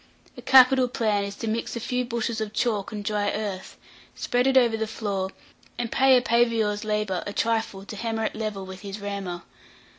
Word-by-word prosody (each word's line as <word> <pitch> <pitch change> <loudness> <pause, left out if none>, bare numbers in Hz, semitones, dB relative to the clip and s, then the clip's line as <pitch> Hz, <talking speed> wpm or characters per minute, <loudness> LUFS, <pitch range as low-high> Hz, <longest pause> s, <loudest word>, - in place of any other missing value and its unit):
A - - -10
capital 260 0 +6
plan 215 -4 0
is 200 0 -6
to 230 - -5
mix 225 +3 -2
a - - -3
few 250 +2 -1
bushels 235 -2 -2
of 215 -1 -4
chalk 215 -3 -1
and 210 -2 -5
dry 205 -1 0
earth, 205 -3 -4 0.4
spread 245 +1 0
it 265 0 +4
over 235 -3 +4
the 220 0 -2
floor, 200 -4 -3 0.5
and 240 -2 -3
pay 265 -1 +5
a 250 - +1
paviour's 230 -3 +2
labourer 210 -4 -1
a 205 - -4
trifle 225 -4 -1
to 210 - -8
hammer 225 +1 -2
it - - -2
level 215 -3 -4
with 190 0 -9
his 200 +1 -7
rammer. 200 -4 -5
220 Hz, 200 wpm, -25 LUFS, 205-235 Hz, 0.5 s, capital